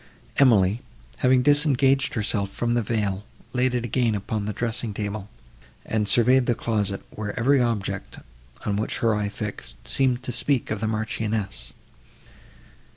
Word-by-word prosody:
Emily, 110 -5 +4 0.4
having 125 0 +4
disengaged 140 -2 +4
herself 105 -3 0
from 120 +4 -1
the 120 - +2
veil, 105 -3 -1 0.3
laid 125 0 +1
it 120 -1 -1
again 115 -3 +1
on 105 -2 -1
the - - -1
dressing 115 -1 -3
table, 105 -1 -4 0.6
and 110 -2 -1
surveyed 125 +4 +4
the 120 - +2
closet, 105 -4 -1
where 105 +2 -5
every 135 +3 +4
object, 115 -5 -2 0.5
on 100 -1 0
which 110 - -2
her 115 -1 +2
eye 105 -1 -1
fixed, 105 0 -6
seemed 130 -2 +1
to 125 - -4
speak 130 0 -1
of 105 - -1
the 110 - 0
Marchioness. 110 - -2
110 Hz, 150 wpm, -24 LUFS, 105-125 Hz, 0.6 s, Emily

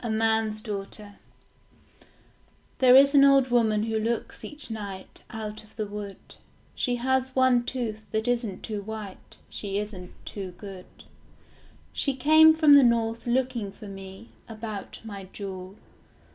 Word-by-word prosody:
A 235 - -3
MAN'S 220 -1 +1
DAUGHTER 205 -1 -6 1.6
There 255 -1 +7
is 275 +1 +7
an 280 -1 +7
old 275 -2 +5
woman 220 -3 +2
who 220 0 -1
looks 230 +1 -3
each 295 -5 -8
night 200 -3 -7
Out 215 -1 -6
of 215 - -22
the 215 - -2
wood. 205 -1 -7 0.6
She 245 -2 -1
has 260 +1 0
one 255 -2 +4
tooth, 220 -5 -4
that 220 +1 -1
isn't 235 -6 -1
too 210 -2 -4
white. 210 -2 -9
She 200 -1 -4
isn't 200 -4 -6
too 190 -3 -6
good. 195 -3 -10 1.1
She 275 -2 -1
came 315 +4 +6
from 310 -2 +6
the 285 -1 +9
north 230 -1 +1
looking 240 -4 0
for 205 +1 -12
me, 195 +2 -10 0.2
About 215 -2 -7
my 200 -3 -7
jewel. 190 -1 -8
220 Hz, 145 wpm, -26 LUFS, 205-250 Hz, 1.6 s, the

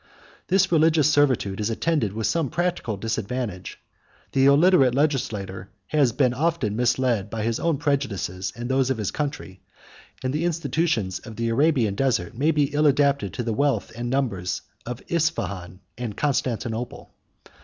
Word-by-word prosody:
This 190 0 +3
religious 155 -2 +4
servitude 130 -9 +2
is 105 +1 0
attended 120 - 0
with 110 +2 -3
some 150 +5 0
practical 175 - -1
disadvantage; 115 -2 -4 0.5
the 135 0 +4
illiterate 140 -3 +5
legislator 105 -10 -1 0.2
had 135 -2 +1
been 130 -4 +3
often 150 -7 0
misled 120 -3 +1
by 110 0 -3
his 115 0 -1
own 165 -3 +1
prejudices 115 - -2
and 120 +1 -5
those 130 0 +1
of 130 - 0
his 105 -3 -2
country; 140 -10 -5 0.6
and 130 +1 -1
the 155 +3 -1
institutions 160 - 0
of 115 -2 -10
the 115 +1 -1
Arabian 125 -4 +2
desert 105 -7 0
may 145 +6 +1
be 150 -2 +1
ill 150 +1 +3
adapted 140 -7 +2
to 120 - -2
the 115 -1 -1
wealth 130 -4 0
and 120 +1 -4
numbers 115 -9 -1 0.2
of 125 +1 -6
Ispahan 100 - -2 0.2
and 115 -4 -4
Constantinople. 120 -4 -2
125 Hz, 155 wpm, -24 LUFS, 110-145 Hz, 0.6 s, illiterate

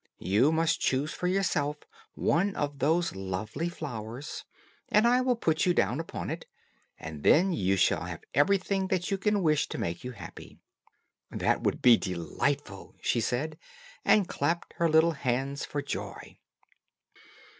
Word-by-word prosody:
You 110 +10 +3
must 160 0 +1
choose 140 +4 0
for 180 - -2
yourself 160 -6 0 0.4
one 195 +4 +1
of 145 -1 -3
those 160 - +1
lovely 100 - -3
flowers, 125 -5 -6 0.4
and 210 +2 +4
I 250 +1 +4
will 255 -1 +2
put 160 -7 +1
you 175 - +3
down 130 - +1
upon 165 - -5
it, - - -6 0.5
and 80 -2 -8
then 180 - +4
you 95 - +1
shall - - +2
have - - -7
everything 190 +5 +2
that 185 -1 -1
you 195 - 0
can 210 -1 +1
wish 155 -2 +2
to - - -5
make 85 0 -3
you 125 0 -5
happy." 90 -7 -11 0.7
"That - - 0
will - - 0
be 120 -2 +7
delightful," 100 - -3
she 120 - 0
said, 150 +7 -2 0.4
and 205 -4 +4
clapped 170 0 -2
her 170 -1 +2
little 160 +2 +5
hands 135 -1 -2
for 145 -1 -4
joy. - - -6
150 Hz, 155 wpm, -29 LUFS, 120-175 Hz, 0.7 s, be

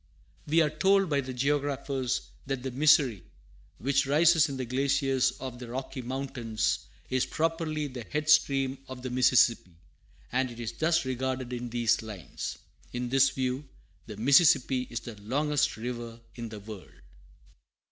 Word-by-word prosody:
[Footnote - - -33
A: - - -10
We 165 +2 +5
are 155 0 -3
told 195 -1 +4
by 140 -1 +2
the 130 -1 -6
Geographers 135 -1 -1 0.3
that 135 -2 -3
the 130 - -3
Missouri, 130 - +4 0.5
which 140 +2 +1
rises 160 +2 +5
in 135 - -4
the 130 - -3
glaciers 135 +1 +1
of 130 -2 -6
the 125 - -8
Rocky 130 +2 -5
Mountains, 120 - -2 0.2
is 130 0 +1
properly 160 -1 -1
the 130 -4 -6
head 150 0 -3
stream 135 -3 +3
of 130 -1 -9
the 130 - -4
Mississippi, 125 -7 +3 0.6
and 130 -1 +1
it 120 -1 -10
is 115 -2 -3
thus 165 0 +1
regarded 130 -1 -3
in 120 0 -4
these 120 0 +1
lines. 105 -6 -6 0.4
In 125 0 -3
this 135 +1 +5
view, 130 +1 -2 0.4
the 105 - -8
Mississippi 135 0 +4
is 120 -1 -4
the 110 -3 -10
longest 145 +5 0
river 120 0 -6
in 115 -2 -6
the 105 -1 -8
world. 105 -2 -10
130 Hz, 160 wpm, -29 LUFS, 120-140 Hz, 0.6 s, We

